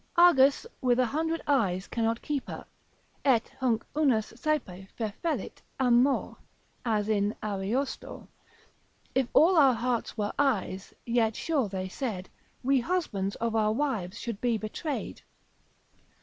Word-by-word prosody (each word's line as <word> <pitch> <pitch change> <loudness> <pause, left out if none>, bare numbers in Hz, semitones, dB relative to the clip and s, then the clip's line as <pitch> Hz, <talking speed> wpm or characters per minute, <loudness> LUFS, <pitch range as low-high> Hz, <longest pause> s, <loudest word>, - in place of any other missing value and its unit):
Argus 295 -3 +6 0.2
with 250 -2 +3
a 255 - +4
hundred 320 +6 -1
eyes 200 -10 +1
cannot 230 0 -1
keep 285 -3 -2
her, - - -7 0.6
et 250 -5 +3
hunc 245 -4 +1
unus 260 -8 +2
saepe 195 -12 -2
fefellit 230 - -3 0.2
amor, 250 +1 +3 0.5
as 215 -3 0
in 205 -1 +1
Ariosto, 215 +6 -3 0.9
If 265 -1 +2
all 345 +5 +5
our 270 -5 +6
hearts 235 0 -2
were 205 -1 -1
eyes, 205 -8 0
yet 230 -2 +1
sure 285 -10 0
they 190 -1 -3
said 190 -3 -4 0.3
We 270 +1 +3
husbands 235 - -1
of 230 -1 -2
our 215 -1 +2
wives 220 -8 -2
should 230 -4 -5
be 240 -2 +2
betrayed. 240 +8 -4
235 Hz, 130 wpm, -28 LUFS, 210-275 Hz, 0.9 s, Argus